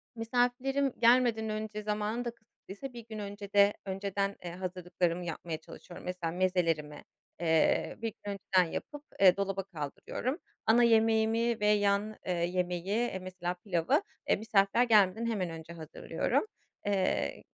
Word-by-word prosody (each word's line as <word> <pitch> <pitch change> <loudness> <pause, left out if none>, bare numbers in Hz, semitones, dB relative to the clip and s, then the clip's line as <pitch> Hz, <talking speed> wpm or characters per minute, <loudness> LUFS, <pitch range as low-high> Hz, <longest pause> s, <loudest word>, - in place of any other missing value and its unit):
misafirlerim 250 +4 +1
gelmeden 235 -2 +4
önce, 215 0 -4
zamanım 210 +3 -2
da 235 - -2
kısıtlıysa 230 +2 -11
1 235 -2 -10
gün 220 -1 -6
öncede 205 0 +2
önceden, 195 +1 -2
eee, 175 - -5
hazırlıklarımı 180 -1 -2
yapmaya 165 -1 -4
çalışıyorum. 175 +2 -12
Mesela 180 -2 -3
mezelerimi, 165 -5 0 0.4
eee, 160 -2 +2
1 225 -2 -2
gün 205 - -3
önceden 180 -3 +2
yapıp, 295 -1 -6 0.2
eee, 190 -1 +7
dolaba 195 -1 -1
kaldırıyorum. 190 - -4 0.3
Ana 235 +2 +5
yemeğimi 225 0 +3
ve 210 - +2
yan, 205 0 +2
eee, 180 - 0
yemeği, 175 0 -1
eee, 215 0 0
mesela 185 -1 -4
pilavı, 175 -3 +1 0.2
e, - - +3
misafirler 215 +1 +3
gelmeden 215 -1 +4
hemen 205 -7 -1
önce 165 +1 -8
hazırlıyorum. 160 - -2 0.4
Eee, 195 -2 0
200 Hz, 135 wpm, -31 LUFS, 180-225 Hz, 0.4 s, eee